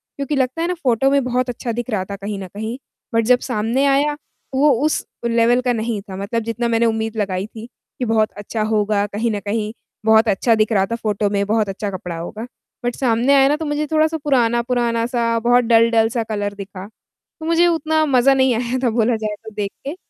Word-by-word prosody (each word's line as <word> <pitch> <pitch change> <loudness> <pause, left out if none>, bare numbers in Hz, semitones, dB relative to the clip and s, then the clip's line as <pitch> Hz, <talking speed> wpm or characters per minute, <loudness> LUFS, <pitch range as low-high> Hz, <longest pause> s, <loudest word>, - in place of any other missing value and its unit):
क्योंकि 280 +1 -2
लगता 260 +3 0
है 335 - 0
ना 360 - 0
फ़ोटो 255 +1 +3
में 280 -2 +3
बहुत 250 0 -1
अच्छा 240 0 -4
दिख 240 +2 -4
रहा 205 -4 -1
था 200 - -4
कहीं 200 +1 -5
न 190 - -6
कहीं, 220 +6 -5 0.4
बट 230 0 +3
जब 250 +1 +4
सामने 235 +3 0
आया 285 +2 +2 0.4
वो 290 +3 +4 0.2
उस 310 - 0 0.2
लेवल 235 +1 +3
का 250 -1 +1
नहीं 225 -2 -2
था 195 -2 -9
मतलब 200 +4 -2
जितना 230 +1 -2
मैंने 230 0 +2
उम्मीद 225 0 -1
लगाई 195 -2 -1
थी, 220 0 -10 0.3
कि 250 - 0
बहुत 220 -1 +1
अच्छा 210 +2 -4
होगा 210 -1 +1
कहीं 215 +3 -2
न 210 - -2
कहीं, 210 +2 -2 0.3
बहुत 220 +1 +5
अच्छा 220 +3 +2
दिख 215 +1 +1
रहा 195 -3 +3
था - - +1
फ़ोटो 210 -3 -1
में 200 0 0
बहुत 215 0 +1
अच्छा 200 +1 -3
कपड़ा 180 -2 -6
होगा। 210 +7 -6 0.4
बट 245 - -1
सामने 245 +1 +2
आया 270 0 +6
ना 290 - +2
तो 320 - -4
मुझे 295 0 -1
थोड़ा-सा 315 +1 +2
पुराना-पुराना 240 -3 +1
सा 235 -2 0
बहुत 245 +2 +3
डल-डल 230 -1 +4
सा 235 -1 -1
कलर 205 -1 -2
दिखा। 195 -1 -8 0.6
मुझे 335 +2 +3
उतना 315 -2 +1
मजा 270 -1 +4
नहीं 260 -1 +3
आया 240 +2 -1
था 245 - +3
बोला 230 +1 +1
जाए 215 -1 -3
तो 220 - -9
देख 205 -2 -2 0.2
के 290 - -3
230 Hz, 220 wpm, -20 LUFS, 215-255 Hz, 0.6 s, आया